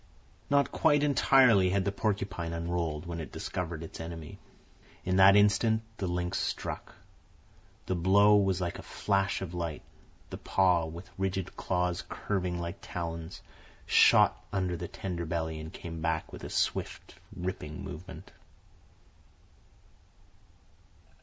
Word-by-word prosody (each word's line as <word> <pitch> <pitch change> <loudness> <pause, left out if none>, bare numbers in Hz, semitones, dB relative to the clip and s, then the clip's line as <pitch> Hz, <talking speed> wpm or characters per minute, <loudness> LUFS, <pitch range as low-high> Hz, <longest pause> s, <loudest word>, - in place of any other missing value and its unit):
Not 140 0 +3
quite 145 -1 +3
entirely 130 -9 +5
had 95 0 +1
the 100 - +1
porcupine 95 -5 -2
unrolled 85 -2 -2
when 85 -1 -5
it 80 -5 -7
discovered 85 -3 -4
its 80 - -9
enemy. 80 -1 -7 0.7
In 95 +1 +1
that 95 +1 +8
instant 110 +2 +4
the 95 - -2
lynx 90 0 -1
struck. - - -4 0.9
The - - -1
blow 100 +4 +5
was 95 -3 +2
like 90 -2 -3
a - - -6
flash 100 -1 -1
of 90 -2 -7
light. 85 -3 -4 0.5
The - - -6
paw, 90 -4 +2
with 85 +3 -9
rigid 95 -1 -2
claws 90 -1 -1
curving 90 -3 -2
like 85 0 -5
talons, 85 -1 -6 0.4
shot - - +5
under 95 -3 -1
the 85 +1 -5
tender 90 -2 -5
belly 80 -1 -2
and 80 +1 -7
came 80 -1 -7
back 80 -1 -2
with - - -9
a - - -5
swift - - -2 0.2
ripping 90 -4 -5
movement. 85 +2 -9
90 Hz, 135 wpm, -30 LUFS, 85-95 Hz, 0.9 s, that